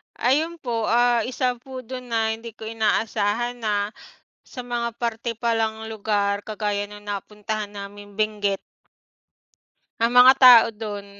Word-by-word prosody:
Ayun 315 +7 0
po 230 -3 -2
ah, 240 0 +3
isa 250 -1 -1
po 260 +1 -9
dun 250 -1 -7
na 220 -1 +1
hindi 225 0 -6
ko - - -16
inaasahan 220 +1 -1
na 210 -2 -1 0.5
sa - - -11
mga 240 -1 -2
parte 235 0 -2
palang 220 -1 -1
lugar 205 -2 -1
kagaya 210 -1 -2
nung 205 0 -11
napuntahan 210 +1 -5
namin 205 0 -10
Benguet. 205 -2 0 1.5
Ang 230 - +3
mga 255 +1 +10
tao 245 -3 +10
dun 210 -2 -6
220 Hz, 135 wpm, -23 LUFS, 205-240 Hz, 1.5 s, mga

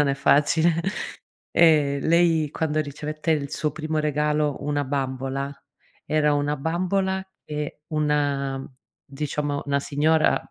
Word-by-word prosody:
non 145 - +3
è 140 - +2
facile, 150 +4 +3 0.8
ehm, 150 -4 +4
lei 165 -2 +3
quando 155 -1 -1
ricevette 150 +2 -3
il 145 -3 0
suo 150 0 -1
primo 155 0 -3
regalo, 150 -1 +1
una 145 0 0
bambola, 135 0 -2 0.5
era 150 -1 +2
una 145 +1 0
bambola 190 +5 -1 0.2
che 150 -1 -5
una, 145 -3 0 0.4
diciamo 145 0 -3
una 140 -1 +1
signora 155 +3 +2
150 Hz, 120 wpm, -24 LUFS, 140-155 Hz, 0.8 s, ehm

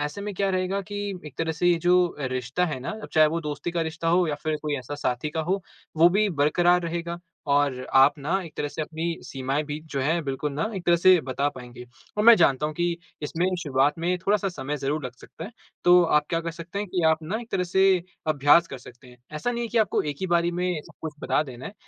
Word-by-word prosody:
ऐसे 150 +6 -4
में 205 +1 -4
क्या 195 +1 0
रहेगा 185 +1 -1
कि 205 - -4 0.3
एक 150 - -11
तरह 165 0 0
से 165 +3 -1
ये 175 -1 +4
जो 180 0 +3
रिश्ता 130 +4 -1
है 150 -5 -3
ना 135 - -4 0.2
चाहे 155 -1 +6
वो 165 +2 -1
दोस्ती 150 +2 -4
का 170 0 -2
रिश्ता 165 +1 -3
हो 175 +1 +3
या 150 - 0
फिर 155 -1 -1
कोई 150 -1 -1
ऐसा 130 +3 -7
साथी 140 0 -2
का 160 - -2
हो 185 +4 -1 0.3
वो 165 +2 +7
भी 205 +4 +2
बरकरार 175 +3 +3
रहेगा। 170 0 -4 0.3
और 140 -3 +2 0.2
आप 140 +3 +6
ना 145 +4 -3
एक 165 -3 -10
तरह 145 - -2
से 155 - -4
अपनी 165 +2 -3
सीमाएँ 135 +2 -2
भी 145 0 -4
जो 140 - -2
हैं 160 +5 +1
बिल्कुल 140 +1 -3
ना 150 +4 -1
एक 180 - -6
तरह 175 0 +5
से 180 +1 +6
बता 135 +1 -1
पाएँगे। 125 -1 -10 0.3
और 210 - +1
मैं 235 +1 +10
जानता 150 -5 +3
हूँ 155 - -5
कि 175 +1 0 0.3
इसमें 165 +4 -1 0.2
शुरुआत 140 +2 +1
में 175 +2 0
थोड़ा 200 +3 +2
सा 195 -1 -2
समय 150 -5 -4
ज़रूर 145 +1 -2
लग 125 - -5
सकता 165 - -10
है। 200 - -8 0.3
तो 180 0 +7
आप 150 -2 +2
क्या 165 - +1
कर 165 0 -4
सकते 170 +3 -7
हैं 205 - -2
कि 180 -1 -1
आप 160 0 +2
ना 190 +8 -3
एक 235 - -12
तरह 180 -1 +1
से 190 0 +3 0.2
अभ्यास 155 +2 +4
कर 135 - -8
सकते 125 +1 -15
हैं। 125 - -16 0.2
ऐसा 245 +11 -1
नहीं 235 0 -3
है 230 - -4
कि 235 - 0
आपको 215 - +2
एक 145 -2 -4
ही 190 - -1
बारी 170 -1 +2
में 175 -2 -1
सब - - -15
कुछ 160 -1 -4
बता - - +1
देना 130 -3 -9
है। 200 - -8
165 Hz, 255 wpm, -25 LUFS, 145-180 Hz, 0.3 s, मैं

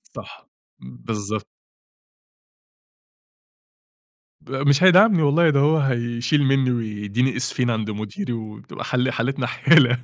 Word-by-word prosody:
صح، - - -12 0.3
بالضبط. 100 - -6 2.9
ب - - -17
مش 140 +3 +1
هيدعمني 185 0 +5
والله، 155 +3 +3
ده 140 -2 +2
هو 150 +3 +3
هيشيل 120 0 -1
مني 135 -1 +1
ويديني 115 +2 -2
اسفين 125 0 -1
عند 110 -2 -2
مديري، 110 - -6
وبتبقى 110 -2 -9
ح - - -3
حالتنا 125 +2 -2
حالة 130 -3 +3
125 Hz, 110 wpm, -21 LUFS, 110-145 Hz, 2.9 s, هيدعمني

